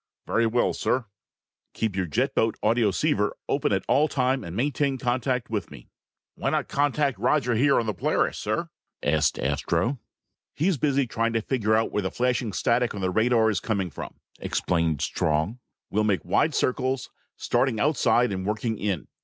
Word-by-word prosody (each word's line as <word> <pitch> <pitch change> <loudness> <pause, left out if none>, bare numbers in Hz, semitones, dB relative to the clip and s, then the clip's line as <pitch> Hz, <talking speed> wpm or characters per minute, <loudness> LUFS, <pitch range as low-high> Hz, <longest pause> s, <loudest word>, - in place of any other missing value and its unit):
"Very 115 +1 +2
well, 120 +2 +1
sir." 130 -2 0 0.7
"Keep 110 -4 -1
your 95 -2 -1
jet 130 - 0
boat 110 -1 +1
audioceiver 110 -4 +2
open - - +1
all 150 +2 +4
the - - -10
time 130 -1 +1
and 85 -1 -7
maintain 140 +2 0
contact 125 -1 -1
with 105 -6 -2
me." 70 -4 -14 0.4
"Why - - -2
not - - 0
contact 145 -1 0
Roger 135 -5 +2
here 140 +5 +3
on 115 - -1
the 110 - -1
Polaris, 90 - 0
sir?" - - -2 0.3
asked 75 +1 +2
Astro. 125 +2 0 0.6
"He's 175 +1 +1
busy 140 -1 +2
trying 115 0 -1
to 115 - +1
find 120 -4 -2
out 110 +1 +3
where 105 - 0
the 95 - -2
flashing 125 -1 0
static 120 +3 +1
on 100 - -5
the 95 -1 0
radar 110 +2 +3
is 100 - -1
coming 95 -5 -2
from," - - -8 0.2
explained 85 -4 0
Strong. 80 +10 0 0.3
"We'll 105 +2 +1
make 100 -6 0
wide - - +2
circles, 130 +1 0 0.3
starting 125 -5 0
outside 125 -3 +2
and 95 -1 -3
working 105 +2 -2
in. 100 -6 -2
115 Hz, 170 wpm, -25 LUFS, 100-130 Hz, 0.7 s, all